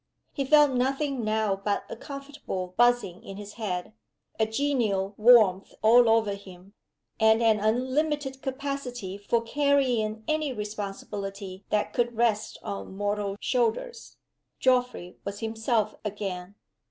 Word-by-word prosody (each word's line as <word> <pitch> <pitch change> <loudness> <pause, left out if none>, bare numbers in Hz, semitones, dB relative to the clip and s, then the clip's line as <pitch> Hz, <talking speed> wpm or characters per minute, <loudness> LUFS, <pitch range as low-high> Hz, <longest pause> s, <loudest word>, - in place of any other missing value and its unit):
He 275 - -2
felt 295 0 +6
nothing 270 +1 0
now 215 -2 +1
but 200 +1 -2
a - - -6
comfortable 275 -9 -6
buzzing 240 -7 +2
in 195 - -8
his 205 0 -8
head, 180 -1 -3 0.5
a 220 - +3
genial 220 -6 0
warmth 215 -4 +5
all 235 +2 +7
over 225 -2 +3
him, 195 -1 -12 0.5
and 220 0 +5
an 220 -2 +4
unlimited 265 +5 0
capacity 265 -7 -4
for 215 +3 0
carrying 245 -5 +1
any 310 -2 0
responsibility 200 -2 -6
that 210 -1 0
could 240 -2 0
rest 225 -3 +1
on 100 - -6
mortal 205 -1 -1
shoulders. 260 - -1 0.4
Geoffrey 250 -8 +1
was 200 0 -5
himself 220 -1 0
again. 195 -2 -5
220 Hz, 125 wpm, -27 LUFS, 200-255 Hz, 0.5 s, all